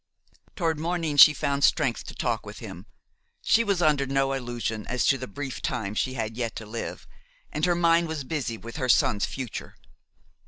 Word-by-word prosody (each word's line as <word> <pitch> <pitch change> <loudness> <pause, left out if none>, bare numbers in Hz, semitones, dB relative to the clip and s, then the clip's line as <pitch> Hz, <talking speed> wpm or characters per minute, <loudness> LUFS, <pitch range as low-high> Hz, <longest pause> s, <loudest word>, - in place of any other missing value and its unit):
Toward 165 -4 0
morning 165 -2 -1
she 150 +2 +10
found 140 -1 -1
strength 135 -7 +2
to - - -9
talk - - -1
with - - -9
him; - - -9 0.6
she 230 - +4
was 200 -5 0
under 145 -3 +3
no 135 0 +1
illusion 120 -4 -4
as 125 0 0
to 135 - +4
the 130 - -5
brief 135 +5 -6
time 115 -9 -2
she 130 +4 -1
had 110 -2 -3
yet 115 -2 -3
to 110 - -7
live 110 +2 -6 0.5
and 150 - 0
her 175 -1 +2
mind 170 0 +3
was 160 -3 -4
busy 130 -5 -3
with 115 +4 -9
her 130 -4 -2
son's 105 -3 +3
future. 130 -5 -6
135 Hz, 190 wpm, -26 LUFS, 120-160 Hz, 0.6 s, she